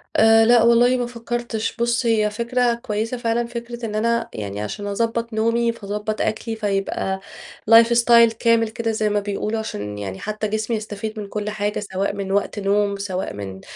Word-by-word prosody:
آآ، 225 0 +6
لأ 235 0 +6
والله 240 +2 +5
ما 245 - -1
فكرتش، 235 -1 -4
بُصّ، 235 +1 0
هي 215 -2 +2
فكرة 235 +2 0
كويسة 230 0 -3
فعلًا، 235 0 -1
فكرة 235 0 -6
إن 210 - -4
أنا 235 +2 0
يعني 100 -1 -5
علشان 205 - -5
أضبّط 230 +2 -2
نومي 230 +2 +1
فاضبّط 210 0 -4
أكلي، 225 +1 -2
فيبقى 195 -2 -2 0.5
life 230 0 +9 0.2
style 235 -1 +6
كامل 230 -1 +3
كده 225 +1 -2
زي 215 -1 0
ما 205 0 +1
بيقولوا، 205 +2 -3
علشان 105 - -5
يعني 95 -2 -5
حتى 215 0 -3
جسمي 220 +2 -1
يستفيد 215 +1 -6
من 205 - -5
كل 210 +1 -4
حاجة، 210 0 -2
سواء 195 +2 0
من 195 -1 -4
وقت 200 +1 0
نوم، 200 0 +1
سواء 190 -2 -3
من 95 -2 -7
220 Hz, 180 wpm, -21 LUFS, 205-235 Hz, 0.5 s, life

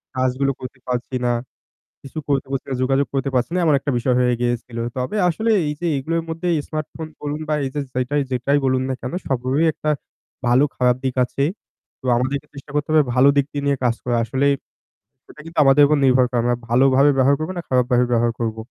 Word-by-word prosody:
কাজগুলো 130 +2 +1
করতে 130 0 -9
পারছি 125 +1 -3
না। 120 - +2 0.7
কিছু 140 +3 -8
করতে 140 -1 +1
পারছি 135 - -3
না, - - -1
যোগাযোগ 135 +2 +2
করতে 135 0 0
পারছি 125 +4 +1
না। - - +1
এমন 155 -3 +4
একটা 140 - -3
বিষয় 125 +1 +1
হয়ে 125 -1 +3
গিয়েছিল। 120 -1 -2 0.2
তবে 130 +11 -2
আসলে 220 +7 0 0.2
এই 150 - -1
যে 175 - -2
এগুলোর 165 +4 -1
মধ্যে 165 +2 -3 0.2
স্মার্ট 155 -1 -3
ফোন 160 -1 -6
বলুন 150 +1 -3
বা 155 - +1
এই - - -1
যে 145 - -1
যেটাই 135 +3 0
যেটাই 140 +4 +1
বলুন 130 0 +2
না 130 - -1
কেন 125 - -5
সবগুলোর 130 +2 0
একটা 155 - -3 0.6
ভালো 125 +4 +4
খারাপ 125 -1 +3
দিক 130 - -1
আছে। 140 +2 -3 0.6
তো - - -27
আমাদেরকে 140 +4 -1
চেষ্টা 140 +1 -11
করতে 145 0 -1
হবে 155 -1 +6
ভালো 130 +2 +6
দিক 140 -1 +3
টি 145 - -4
নিয়ে 140 -1 +2
কাজ 120 -1 +3
করা। 120 -1 0
আসলেই 140 +4 +1 0.8
এটা 150 - -14
কিন্তু 165 -1 -8
আমাদের 135 +2 +6
উপর 150 +1 +3
নির্ভর 130 -1 +5
করে। 125 - 0
আমরা 120 0 +1
ভালোভাবে 135 +3 +4
ব্যবহার 135 +2 +4
করব 155 +4 -3
না - - -3
খারাপ 125 -1 +3
ভাবে 125 0 +4
ব্যবহার 120 0 +3
করব। 115 -1 -1
135 Hz, 215 wpm, -21 LUFS, 125-145 Hz, 0.8 s, হবে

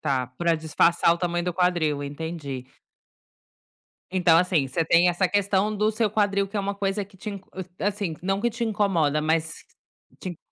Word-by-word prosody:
Tá, 135 -4 0
para 165 +6 0
disfarçar 170 +2 +3
o - - -8
tamanho 175 -1 -1
do 180 -1 -2
quadril, 170 -5 +1
entendi. 145 -3 -6 1.4
Então 180 -3 +4
assim, 175 -6 +2
você 160 +5 -1
tem 170 +2 +4
essa 175 +1 +1
questão 205 +1 +1
do 210 +1 +1
seu 220 -1 0
quadril, 200 -2 +1
que 210 - -6
é - - +1
uma 200 +1 -2
coisa 200 0 -2
que 195 0 -20
te 210 - -6
in 200 -1 -7 0.4
eh, - - -2
assim, 200 -5 -2
não 195 +1 0
que 240 +2 +1
te 235 +1 -3
incomoda, 185 -9 +1
mas 160 +1 0 0.7
te 180 -2 -6
180 Hz, 185 wpm, -25 LUFS, 160-200 Hz, 1.4 s, Então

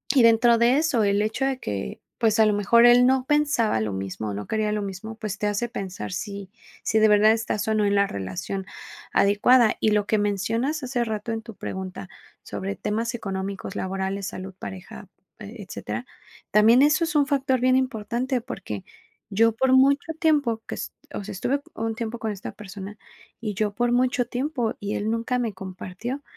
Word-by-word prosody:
y 260 - +6
dentro 230 +1 +6
de 240 +3 +4
eso, 300 -8 +2
el 200 0 +2
hecho 220 +5 -1
de 270 -1 -1
que, 105 - -4 0.2
pues 220 -1 +2
a 220 - +7
lo 210 - +3
mejor 220 +4 +5
él 245 +1 +7
no 260 0 +2
pensaba 290 - +2
lo 105 -2 -2
mismo, 95 +2 -4
no 105 +1 -5
quería 215 -1 0
lo 210 - -1
mismo, 200 +3 -6
pues 215 -2 -5
te 210 - -2
hace 205 +4 -1
pensar 190 -4 -5
si 200 +1 -5 0.3
si 220 - +1
de 220 - +6
verdad 210 +1 +6
estás 220 -2 -2
o 220 - +2
no 210 -1 +2
en 200 - +2
la 200 0 +3
relación 100 - -4 0.5
adecuada. 215 +4 +4
Y 215 - +2
lo 210 -1 +1
que 215 - +2
mencionas 225 +9 0
hace 250 -1 -1
rato 220 0 -3
en 225 0 -3
tu 225 -2 -10
pregunta 190 0 -6 0.3
sobre 195 +1 -4
temas 225 +3 -2
económicos, 195 -2 -5
laborales, 190 +1 -3
salud, 185 0 -7
pareja, 190 +1 -9 0.3
eh, 210 +2 -9
etcétera, 110 - -5 0.5
también 220 +4 +6
eso 300 +4 +4
es 330 0 -2
un 290 -2 +4
factor 270 -3 +1
bien 255 +1 +3
importante, 255 0 -1
porque 195 - -6 0.5
yo 225 +3 +4
por 260 +4 +1
mucho 280 +4 +4
tiempo 285 -9 +2
que - - -4
est - - -6 0.2
o 205 - -4
sea, 210 - -7
estuve 265 +9 -1
un 225 0 -2
tiempo 230 0 -4
con 220 -2 -2
esta 200 0 -7
persona, 200 0 -9 0.4
y 215 -2 -3
yo 210 0 0
por 240 +1 +1
mucho 250 0 +2
tiempo 250 -2 -2
y 205 0 -3
él 215 +2 -1
nunca 230 +2 -1
me 230 -4 -2
compartió 190 +8 -6
220 Hz, 195 wpm, -25 LUFS, 200-245 Hz, 0.5 s, a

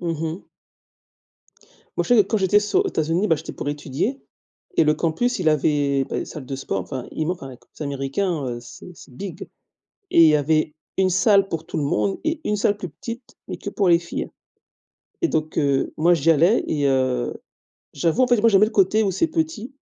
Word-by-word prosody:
Mmh 165 -3 -3
mh. 160 - -3 1.6
Moi - - +2
je 245 - +2
sais 210 - +6
que - - -17
quand 220 - +1
j'étais 195 +2 +4
so 210 - +1
aux 390 - -1
États-Unis, 165 - 0
bah, 160 - +3
j'étais - - -8
pour 145 - -4
étudier 145 - -3 0.6
et - - +5
le 150 - +3
campus, 170 +11 0
il 160 - +1
avait, 145 -2 +1
ben, - - -3
salle 145 -4 -9
de 135 +1 -4
sport, 115 -7 -3
enfin 125 +7 -6
il 155 - -2
manque 180 -3 -3
av 135 - -7
les 125 - -12 0.3
américains, 140 +3 -2
heu, 120 -1 -4
c'est 120 +8 -12
c'est 135 - -15
big. 175 +4 -7 0.6
Et 170 - +6
il 160 - +8
y 150 - +5
avait 155 +1 +1 0.2
une 190 -1 +3
salle 195 +1 +4
pour 160 -1 -4
tout - - -6
le - - 0
monde 105 -8 0
et 320 -1 -1
une 210 - 0
salle 205 0 +1
plus 190 -3 -6
petite 230 - -9
mais - - -4
que - - -6
pour 195 -3 +1
les 170 -1 +6
filles. 170 0 -5 0.9
Et 340 - +3
donc, 155 0 -2
heu, 140 -2 +1
moi, 170 +3 +4
j'y 165 0 +2
allais 170 +8 +4
et 145 -2 0
heu, 130 -2 0 0.6
j'avoue, 165 - +1
en 255 - +5
fait, 245 -3 +3
moi, 230 - +5
j'aime 195 -3 +5
bien 215 - +5
le - - -13
côté 205 +2 +3
où 200 - +1
c'est 190 - +1
petit. 300 -7 -3
165 Hz, 220 wpm, -22 LUFS, 145-205 Hz, 1.6 s, il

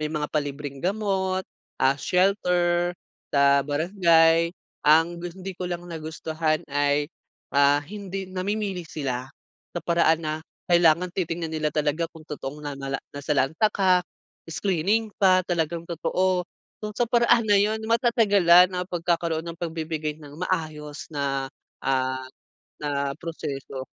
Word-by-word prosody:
May 155 - -1
mga 150 -1 -3
palibreng 145 -2 -3
gamot, 190 -1 0 0.3
ah, 130 +1 +4
shelter 180 +1 +1 0.3
sa 140 0 +4
barangay. 165 +2 +3 0.3
Ang 165 +3 +4
gus 175 0 -7
hindi 190 0 -6
ko 180 0 -5
lang 175 0 -4
nagustuhan 160 -1 -2
ay, 145 0 +2 0.5
ah, 145 +1 +4
hindi 195 +1 -6
namimili 190 +1 -2
sila. 130 -3 -3 0.5
Sa - - -4
paraan 165 -1 +3
na 155 - -1 0.4
kailangan 175 +1 +4
titingnan 165 -3 -3
nila 155 -1 0
talaga 150 +2 0
kung 160 -2 -15
totoong 150 -1 -7
nanala 135 -1 -3 0.2
nasalanta 145 +6 +1
ka, 190 -3 +3 0.5
screening 200 +5 0
pa. 185 -1 +5
Talagang 170 -1 -1
totoo. 180 +2 0 0.3
Kung 210 -1 -6
sa 240 - +2
paraan 235 0 +3
na 205 -2 +4
'yon, 215 +2 +2
matatagalan 205 -7 +5
ang 180 0 -3
pagkakaroon 170 -2 -1
ng 170 0 -8
pagbibigay 160 -2 -3
ng 150 -2 -13 0.2
maayos 155 -3 -4
na, 140 -2 -1 0.4
ah, 130 -1 0 0.6
na 140 -1 -1
proseso. 140 -5 -5
165 Hz, 130 wpm, -25 LUFS, 150-185 Hz, 0.6 s, pa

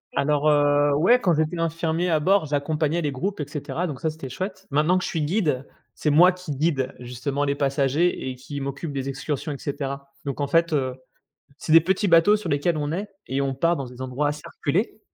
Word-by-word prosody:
Alors 150 +1 +2
heu, 145 0 +4
ouais, 210 +12 +5
quand 175 -9 +2
j'étais 160 +2 0
infirmier 165 +1 0
à 160 - +3
bord 190 +2 +3
j'accompagnais 150 +3 0
les 150 - -1
groupes 180 +8 -3
et 145 - -4
cetera 145 +3 -4
donc 145 -7 -5
ça 160 - +1
c'était 155 -4 -7
chouette. 190 +7 -5
Maintenant 155 +6 +3
que 185 - -2
je - - -2
suis 160 - -2
guide, 150 -5 0 0.3
c'est 150 - -1
moi 175 +5 +7
qui 180 -4 -8
guide 135 -3 0
justement 125 +4 -3
les 140 0 +1
passagers 140 +3 +1
et 130 - -4
qui 140 +3 -7
m'occupe 140 +3 -4
des 135 -1 -3
excursions 145 +2 -3
et 140 - -5
cetera 140 -1 -5
donc 140 0 -3
en 140 - 0
fait, 165 +2 +2
heu, 130 -3 0 0.6
c'est 155 - -4
des 165 - +10
petits 190 +4 +1
bateaux 170 +5 +6
sur 185 -5 -6
lesquels 145 +4 +1
on 145 0 -2
est 200 +5 -3 0.2
et 135 - -1
on 135 -1 0
part 165 +6 +2
dans 135 -4 -4
des 125 +1 -10
endroits 130 +3 -1
assez 150 0 -5
reculés 185 +10 -2
150 Hz, 220 wpm, -24 LUFS, 140-170 Hz, 0.6 s, des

